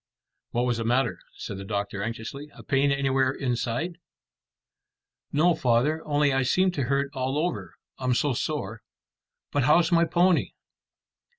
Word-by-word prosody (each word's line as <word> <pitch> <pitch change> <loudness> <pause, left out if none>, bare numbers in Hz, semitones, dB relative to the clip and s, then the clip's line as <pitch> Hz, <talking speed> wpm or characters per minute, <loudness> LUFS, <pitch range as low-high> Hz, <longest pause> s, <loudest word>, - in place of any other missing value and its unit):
"What 120 +1 0
was 120 -2 0
the 115 - -2
matter?" 120 -5 +1 0.2
said 95 - -6
the - - -6
doctor 100 -1 -3
anxiously. 115 +7 -5
"A - - -12
pain 140 0 +2
anywhere 135 -1 +2
inside?" 135 +6 -2 1.3
"No, 165 +5 +4
father, 135 +5 +1
only 145 -1 +2
I 135 - +2
seem 185 +8 +2
to 140 -7 -2
hurt 140 +2 0
all 130 +1 -2
over, 105 - -2 0.2
I'm 130 -1 +1
so 145 +1 +1
sore. 115 -6 -3 0.7
But 145 -3 +1
how's 165 +5 +4
my 170 0 +4
pony?" 175 +1 +2
135 Hz, 150 wpm, -26 LUFS, 120-150 Hz, 1.3 s, No